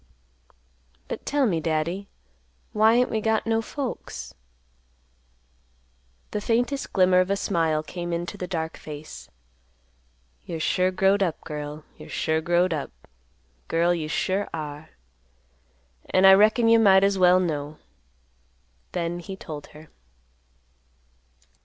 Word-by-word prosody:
"But - - -7
tell 285 -1 +2
me, 175 -8 +1
Daddy, 165 +5 -2 0.6
why 220 +2 +4
ain't 250 +1 +2
we 220 - -1
got 220 0 +1
no 225 0 +1
folks?" 265 +2 -6 2.0
The 210 - -2
faintest 245 +6 -1
glimmer 185 -1 +4
of 185 +1 +1
a 200 - +2
smile 165 -6 0
came 175 +2 -6
into 170 +3 -3
the 185 -2 -5
dark 160 -3 -4
face; 150 0 -10 1.1
"You're 165 - -6
sure 180 +3 +1
growed 195 +2 +2
up, 170 -5 -1
girl; 150 0 -6
you're - - -12
sure 160 0 0
growed 175 +2 +2
up, 150 -3 -3 0.8
girl; 170 +1 +2
you 160 -3 -3
sure 190 +5 -1
are. 150 -1 -6 1.2
An' 185 +1 +4
I 190 - +10
reckon 215 +4 +4
you 230 0 +6
might 195 -3 +6
as 195 -1 +2
well 180 0 +6
know." 150 -4 -3 1.2
Then 175 0 -2
he 190 +2 -7
told 155 -6 -8
her. 155 +1 -15
180 Hz, 130 wpm, -25 LUFS, 160-200 Hz, 2.0 s, I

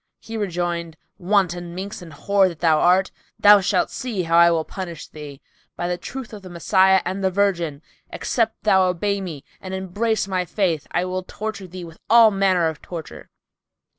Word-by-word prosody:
He 225 - -9
rejoined, 175 -5 -3 0.2
"Wanton 175 -2 0
minx 195 +1 -6
and 170 -2 -11
whore 195 +6 +2
that 170 - -9
thou 160 -3 +3
art, 185 +2 +3 0.3
thou 205 0 +7
shalt 185 -1 +1
see 225 -8 -3
how 165 0 0
I 170 0 +7
will 165 -2 0
punish 175 -5 -7
thee! 145 -2 -10 0.3
By 175 - -3
the 175 0 -2
truth 255 +3 -8
of 210 - -8
the 185 - -11
Messiah 190 +2 +3
and 190 +2 -3
the 190 - +3
Virgin, 175 -6 -1 0.3
except 225 -2 -2
thou 190 -3 +4
obey 200 +3 -1
me 160 -7 -7 0.2
and 190 0 -5
embrace 200 +3 -1
my 185 -2 -1
faith, 175 -5 -1
I 180 - 0
will 185 0 -3
torture 200 0 -6
thee 180 0 -9
with 165 -1 -13
all 230 -1 +7
manner 190 -4 +2
of 160 -1 -5
torture!" 165 -4 -9
185 Hz, 185 wpm, -22 LUFS, 170-200 Hz, 0.3 s, thou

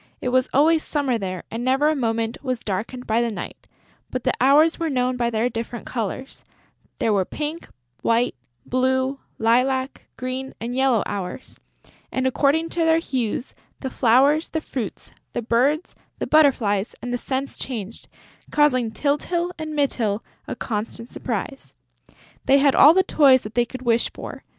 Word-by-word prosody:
It 250 - -2
was 255 0 +2
always 310 +3 +4
summer 275 -6 0
there 185 -2 -4
and 230 +2 -4
never 265 +4 +3
a 310 - +2
moment 230 -3 -1
was 255 -3 -2
darkened 225 +6 -4
by 225 +2 +2
the 235 - 0
night; 215 - -7 0.4
but 255 -1 -4
the - - +1
hours 300 +6 +5
were 330 -1 0
known 255 -2 0
by 240 -1 0
their 225 +1 +1
different 230 0 -5
colours; 250 +3 -5 0.5
there 220 - +1
were 195 -2 +3
pink, 305 - -5 0.3
white, 230 +2 +2 0.3
blue, 260 +2 0 0.2
lilac, 260 +4 +1
green 255 +1 -5
and 235 +2 -4
yellow 260 -4 +3
hours; 195 +4 -6 0.5
and, 260 - -1
according 290 +5 +2
to 345 - -4
their 325 0 +4
hues, 255 -6 -2 0.3
the 265 - -4
flowers, 275 +7 +3
the 320 - -1
fruits, 250 -9 -6 0.2
the 240 - -2
birds, 265 +9 +1 0.2
the - - -2
butterflies 235 -10 +3
and 245 0 -3
the 245 - -1
scents 270 +2 -3
changed, 225 -4 -5 0.4
causing 255 -6 +3
Tyltyl 320 +8 -1
and 310 -1 -5
Mytyl 230 -7 0 0.2
a - - -4
constant 230 +1 -4
surprise. 255 +4 -5 0.7
They 275 - +5
had 280 -1 +4
all 300 +4 +8
the 375 - +5
toys 275 -7 +5
that 210 - -9
they 240 +1 +2
could 255 +1 -9
wish 235 -1 +2
for. - - -9
255 Hz, 165 wpm, -23 LUFS, 230-280 Hz, 0.7 s, all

